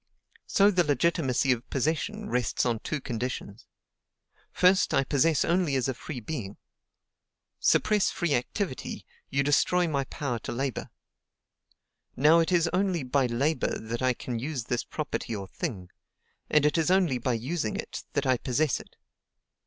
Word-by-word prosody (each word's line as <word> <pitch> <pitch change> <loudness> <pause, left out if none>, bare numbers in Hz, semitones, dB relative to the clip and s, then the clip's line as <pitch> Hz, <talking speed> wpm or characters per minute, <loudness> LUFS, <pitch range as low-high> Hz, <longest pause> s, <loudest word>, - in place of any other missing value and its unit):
So 200 0 +4
the 180 -2 +3
legitimacy 145 -2 +1
of 125 0 -2
possession 165 - -1
rests 125 - 0
on 115 -3 0
two 155 - -3
conditions. 120 -4 -5 0.8
First, 185 +2 +3
I - - +4
possess 145 +2 +2
only 170 -4 +1
as 130 -1 +1
a 130 - 0
free 130 +2 -7
being. 105 -5 -5 1.0
Suppress 210 -2 +3
free 170 -4 -1
activity, 130 - -3 0.2
you 135 +1 +1
destroy 175 +5 +3
my 140 -4 -1
power 125 -3 -3
to - - -6
labor. 135 +2 -3 1.3
Now 155 +5 +5
it 165 +2 +1
is 170 -2 +3
only 185 -4 +1
by 130 0 +1
labor 130 +4 0
that 115 +2 -5
I 130 0 +3
can 120 -1 -4
use 135 0 -3
this 120 +1 -2
property 145 -6 -4
or 100 -2 -6
thing, 95 - -5 0.6
and 150 -1 +4
it 150 +2 +3
is 160 - +1
only 180 -9 +3
by 125 +1 0
using 120 +1 -2
it - - -5
that 145 - 0
I 130 -1 +3
possess 140 +4 0
it. - - -15
140 Hz, 155 wpm, -28 LUFS, 125-165 Hz, 1.3 s, Now